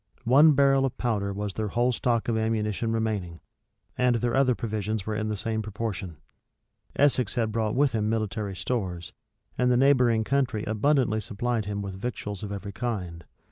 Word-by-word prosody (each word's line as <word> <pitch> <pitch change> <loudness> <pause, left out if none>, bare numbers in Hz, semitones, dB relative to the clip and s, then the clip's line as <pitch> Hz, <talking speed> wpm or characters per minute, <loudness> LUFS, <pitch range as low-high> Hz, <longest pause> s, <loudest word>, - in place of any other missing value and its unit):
One 145 +6 +7
barrel 135 -1 +4
of 135 - -2
powder 105 -5 -1
was 100 0 -4
their 110 +2 -2
whole 120 +4 +1
stock 120 -1 0
of 115 - +1
ammunition 110 0 -1
remaining; 105 -7 -2 0.6
and 125 -1 +2
their 120 +1 0
other 130 -2 +3
provisions 110 -3 -3
were 110 - -2
in 110 0 -2
the 105 -1 -2
same 110 +1 -2
proportion. 100 -5 -5 0.8
Essex 130 -6 +2
had 115 -2 0
brought 110 0 -1
with 140 +1 +3
him 110 -2 0
military 110 -2 -2
stores; 95 -3 -3 0.5
and 125 0 +3
the 125 - +4
neighboring 125 -4 +4
country 130 -4 0
abundantly 110 0 +1
supplied 110 +2 -2
him 100 0 -3
with 100 -1 -5
victuals 105 -5 -4
of 105 - -5
every 100 0 -5
kind. 95 -6 -4
110 Hz, 175 wpm, -26 LUFS, 105-125 Hz, 0.8 s, One